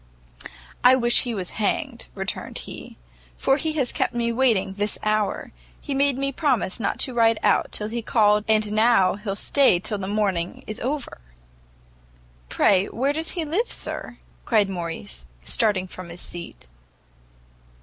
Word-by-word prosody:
"I 250 +1 +8
wish 240 -2 +4
he 240 -2 -3
was 185 -3 -4
hanged," 240 +3 -1
returned 195 -1 -4
he, - - -10 0.4
"for 270 - +2
he 310 +1 -2
has 270 -6 0
kept 245 - -1
me 235 -1 0
waiting 230 -6 +2
this 205 +2 0
hour. 215 -1 -1 0.3
He 285 - -5
made 275 -1 +2
me 275 0 -1
promise 255 - 0
not 205 - -1
to 255 - +1
ride 230 -1 +3
out 205 -2 +2
till 210 - -1
he 235 +2 -3
called 210 -2 +3
and 215 -1 +2
now 215 -3 +4
he'll 200 0 -4
stay 265 -2 +3
till 210 +2 -3
the 190 - -4
morning 195 -4 -1
is 215 - -6
over." 275 - -4 1.3
"Pray 195 -1 +3
where 270 +4 -1
does 320 +2 -1
he 330 - -1
live, 365 +11 -1
sir?" - - -4 0.3
cried 210 -4 +2
Morrice, 165 - -6 0.2
starting 195 - +1
from 185 -1 -9
his 170 +1 -9
seat. 170 - -8
215 Hz, 160 wpm, -24 LUFS, 195-255 Hz, 1.3 s, I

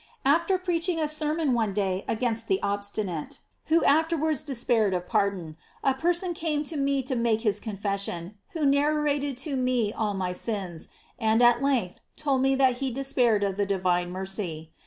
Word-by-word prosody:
After 335 +7 +3
preaching 350 -1 0
a 310 - +1
sermon 305 -1 0
one 220 -4 0
day 195 -2 0
against 225 0 -1
the 190 - +2
obstinate, 200 -5 -3 0.3
who 325 0 +3
afterwards 315 -1 +2
despair 240 -6 +1
of 180 -1 -2
pardon, 195 -7 -1 0.3
a 270 - +3
person 345 +5 0
came 315 -3 -1
to 310 +2 -4
me 275 -1 +1
to 260 +1 -2
make 230 -2 +1
his 210 -3 +1
confession, 200 -4 -3 0.2
who 320 -3 -1
narrated 285 -1 +1
to 290 -3 -2
me 250 -5 +1
all 210 -2 -1
my 185 -1 -2
sins, 185 -5 -4 0.3
and 225 +1 +3
at 240 +1 +5
length 255 -10 0 0.2
told 280 -4 0
me 270 0 +3
that 260 -2 +3
he 270 +1 -1
despaired 250 -5 +1
of 195 -1 -1
the 205 - +1
divine 180 -2 +1
mercy. 180 -4 -4
240 Hz, 170 wpm, -27 LUFS, 200-290 Hz, 0.3 s, at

